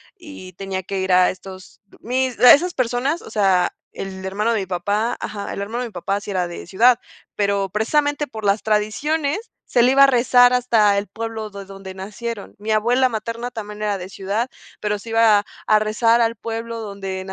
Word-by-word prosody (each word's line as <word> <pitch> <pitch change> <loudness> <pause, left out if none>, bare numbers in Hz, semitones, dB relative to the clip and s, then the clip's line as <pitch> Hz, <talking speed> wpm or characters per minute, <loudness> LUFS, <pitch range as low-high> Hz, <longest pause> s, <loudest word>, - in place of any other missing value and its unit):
y 290 - -11
tenía 190 +1 -4
que 195 +2 -4
ir 190 0 -1
a 180 0 +5
estos 185 0 -12 0.2
mis 255 +1 -1
la 250 - +9
esas 350 +5 +2
personas, 255 +6 -1
o - - -11
sea, 190 -4 +2 0.2
el 190 -1 -7
hermano 210 +4 0
de 220 - 0
mi - - -4
papá. 200 +6 -1
Ajá. 200 -1 -5
El - - -5
hermano 220 +4 -4
de 245 - -4
mi - - -19
papá 195 +2 -2
sí 200 - -7
era 180 -2 0
de 175 - -8
ciudad, 235 +6 +4 0.4
pero 200 -1 0
precisamente 290 +8 0
por 220 -3 -8
las 200 +1 +2
tradiciones 285 - -1 0.2
se 240 - +3
le 255 +2 +4
iba 275 +1 +7
a - - +8
rezar 245 -1 +5
hasta 230 -5 +3
el 200 +1 -2
pueblo 220 +1 -5
de 200 -1 -9
donde 195 -1 -10
nacieron. 210 +3 -6
Mi 210 +2 -7
abuela 240 +4 +3
materna 230 +1 -4
también 210 -3 -7
era 205 -1 0
de 185 0 -8
ciudad, 200 +5 -2 0.3
pero 210 0 -2
se 230 - -11
iba 225 -2 +4 0.2
a 215 - +5
rezar 225 +2 +2
al 230 0 +1
pueblo 230 +1 -5
donde 195 -2 -5
215 Hz, 200 wpm, -21 LUFS, 195-240 Hz, 0.4 s, la